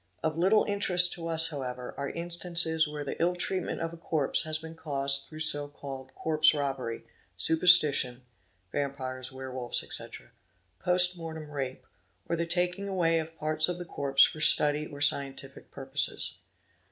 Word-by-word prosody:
Of 155 -1 -1
little 190 +6 +3
interest 180 -3 +5
to 165 -1 -7
us 165 0 +2
however 125 -4 -6
are 140 0 -4
instances 170 -2 +1
where 150 -1 -6
the 140 - -6
ill 175 +1 +1
treatment 185 0 -3
of 165 0 -4
a - - -10
corpse 155 -4 -1
has 155 0 -1
been 160 +1 -10
caused 140 -3 -2
through 155 0 -8
so 145 -2 +2
called 135 -2 -10
corpse 155 -1 +2
robbery, 135 -5 -4 0.3
superstition, 150 -7 +3 0.5
(Vampires, 130 -2 -4
Werewolfs, 130 -2 -4
etc.), - - -6 0.5
post 180 0 +4
mortem 160 -2 -8
rape, 135 -3 -5 0.4
or 170 - -1
the 170 0 -3
taking 180 +3 -1
away 170 -4 +1
of 160 +1 -8
parts 155 +2 +1
of 175 - -3
the 175 - -7
corpse 135 -4 +3
for 155 - 0
study 150 0 +5
or 145 -1 -11
scientific 140 -1 -1
purposes. - - -3
155 Hz, 155 wpm, -28 LUFS, 140-170 Hz, 0.5 s, interest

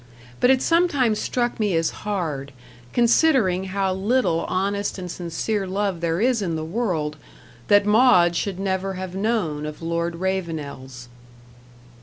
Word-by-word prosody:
But 245 - +4
it 260 -1 +4
sometimes 290 -10 +2
struck 240 -2 -1
me 205 -5 +1
as 165 0 +1
hard, 155 -10 -3 0.4
considering 235 - +3
how 190 0 -1
little 190 -3 +1
honest 200 +2 -1
and 180 -2 -6
sincere 185 +4 -3
love 195 -2 -2
there 165 0 0
is 240 0 +2
in 170 -4 -2
the 155 0 -3
world, 165 -6 -2 0.5
that 205 -1 +5
Maud 210 -6 +5
should 190 +1 -2
never 195 0 -1
have 185 -1 -6
known 190 -7 -1
of 150 0 -6
Lord 170 +1 -2
Ravenel's. 155 -9 -4
190 Hz, 140 wpm, -23 LUFS, 170-215 Hz, 0.5 s, that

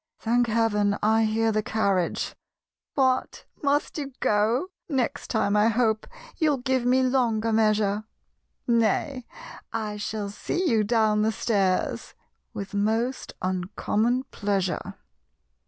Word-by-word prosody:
(Thank 240 +1 +1
heaven, 210 -3 +1
I 220 +1 +4
hear 225 +1 +1
the 215 0 +1
carriage!) 200 -5 0 0.6
"What! 260 -2 +1 0.2
must 290 +2 0
you 275 -2 -5
go? 225 - +1 0.2
Next 275 0 -1
time 210 -3 +1
I 210 +1 +4
hope 225 -1 +1 0.3
You'll 305 -5 +2
give 260 -1 0
me 260 +1 +4
longer 230 -4 +1
measure; 215 -1 +2 0.6
Nay 235 +3 +1 0.4
I 210 -1 -3
shall 205 -1 -4
see 355 - -2
you 220 -5 +3
down 215 -1 +2
the 220 +1 +2
stairs 195 -4 0 0.4
(With 200 0 -7
most 225 +5 -1
uncommon 210 +7 0
pleasure!) 195 -3 -2
220 Hz, 120 wpm, -26 LUFS, 210-250 Hz, 0.6 s, I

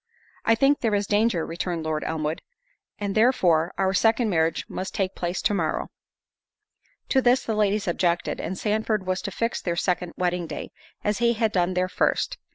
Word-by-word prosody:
"I 225 - +5
think 275 +5 +3
there 225 -3 +1
is 200 0 0
danger," 205 -4 +2
returned 170 0 -3
Lord 155 -1 -2
Elmwood, 155 0 -2 0.6
"and 200 -1 -3
therefore 185 -8 +3
our 190 0 +1
second 225 +2 +3
marriage 160 -1 +1
must 190 - -5
take 190 -1 0
place 175 +1 -3
to - - +2
morrow." 165 -5 -1 1.2
To 265 - +3
this 250 +1 +3
the 225 - -2
ladies 210 -1 +1
objected, 175 0 0
and 185 - -4
Sandford 215 -1 0
was 185 0 -1
to 205 - -4
fix 230 +4 -2
their 170 -2 -1
second 180 -1 -1
wedding 180 -1 -1
day, - - -6 0.3
as 210 +1 0
he 235 0 +3
had 220 -1 0
done 180 -1 +1
their 180 0 +1
first. - - 0
190 Hz, 180 wpm, -25 LUFS, 175-220 Hz, 1.2 s, I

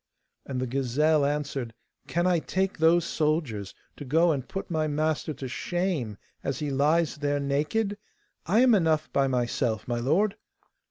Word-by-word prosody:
And 130 -2 -3
the 130 - -1
gazelle 140 +4 +2
answered: 140 -5 -2 0.3
'Can 175 +1 0
I 180 -2 +3
take 190 +2 -2
those 165 +1 +4
soldiers 150 - -1 0.2
to - - -7
go 165 +5 +3
and 135 -4 -2
put 195 -1 -5
my 155 -2 +1
master 155 +1 -1
to 135 0 -6
shame 155 - -2 0.3
as 135 - -2
he 150 -2 -3
lies 150 +3 +2
there 145 -1 0
naked? 155 +10 -1 0.5
I 215 +7 +4
am 255 -2 +6
enough 160 -5 +2
by 140 -1 +3
myself, 120 -3 -1
my 120 -1 -1
lord. 175 - +1
150 Hz, 160 wpm, -27 LUFS, 135-170 Hz, 0.5 s, am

